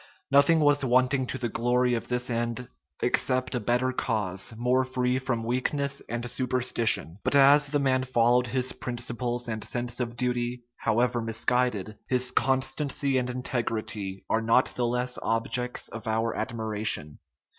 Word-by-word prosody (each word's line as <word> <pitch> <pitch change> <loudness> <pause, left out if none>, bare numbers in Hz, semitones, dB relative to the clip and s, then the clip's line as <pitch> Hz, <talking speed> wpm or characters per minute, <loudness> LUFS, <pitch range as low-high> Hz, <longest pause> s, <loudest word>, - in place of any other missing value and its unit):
Nothing 140 +4 +5
was 145 -1 +4
wanting 130 +1 +2
to 130 - -3
the 120 -2 -2
glory 125 +2 +1
of 115 - -2
this 125 0 -1
end, 120 +1 -2 0.4
except 130 +1 +1
a 125 - 0
better 125 +3 +1
cause, 105 -7 -2
more 125 +2 +2
free 130 0 0
from 130 -3 -2
weakness 140 +4 -1
and 120 +1 -3
superstition. 120 -8 0
But - - +2
as 140 +1 +6
the 145 +1 +1
man 135 -2 +2
followed 125 -1 +2
his 130 +1 -1
principles 120 0 -3
and 110 -2 -4
sense 120 0 -2
of 120 -1 -3
duty, 125 0 -1
however 120 +2 +1
misguided, 115 -2 -1
his 125 -1 +1
constancy 135 +1 +1
and 125 0 -3
integrity 110 -6 -3
are 110 - +1
not 115 +3 +3
the 120 -1 0
less 125 +1 -1
objects 120 +2 -1
of 110 0 -8
our 110 +1 0
admiration. 110 -9 -2
125 Hz, 150 wpm, -27 LUFS, 115-130 Hz, 0.4 s, as